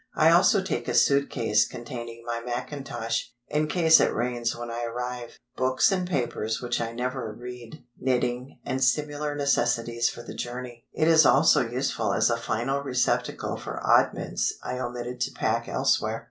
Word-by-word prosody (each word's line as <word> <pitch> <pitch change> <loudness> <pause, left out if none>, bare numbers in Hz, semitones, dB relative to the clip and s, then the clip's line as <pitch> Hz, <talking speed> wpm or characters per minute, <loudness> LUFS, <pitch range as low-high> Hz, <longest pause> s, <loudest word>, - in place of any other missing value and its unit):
I 160 +1 +5
also 185 +3 +5
take - - -3
a - - -1
suit 140 0 +4
case 110 -4 +2
containing 120 -1 -8
my 120 0 -3
mackintosh—in 120 +2 -3
case 160 -1 +5
it - - +3
rains 120 -1 -1
when 120 0 -6
I 120 +1 -4
arrive—books 125 +2 -1
and 185 -2 -1
papers 120 -7 -1
which 120 -1 -2
I 115 0 -2
never 125 -1 -3
read, 125 +4 -10 0.2
knitting, 125 0 -1
and 130 0 -1
similar 145 +3 0
necessities 120 -4 +1
for 120 - -9
the - - -8
journey; 120 -1 -7
it 155 - +1
is 160 -1 +7
also 145 +3 +5
useful 130 +3 -1
as - - +3
a 115 - +1
final 120 +4 -1
receptacle 130 -3 -1
for - - -6
oddments - - +2
I 125 - -4
omitted 125 0 -5
to - - 0
pack - - -1
elsewhere. - - +1
125 Hz, 160 wpm, -26 LUFS, 120-140 Hz, 0.2 s, is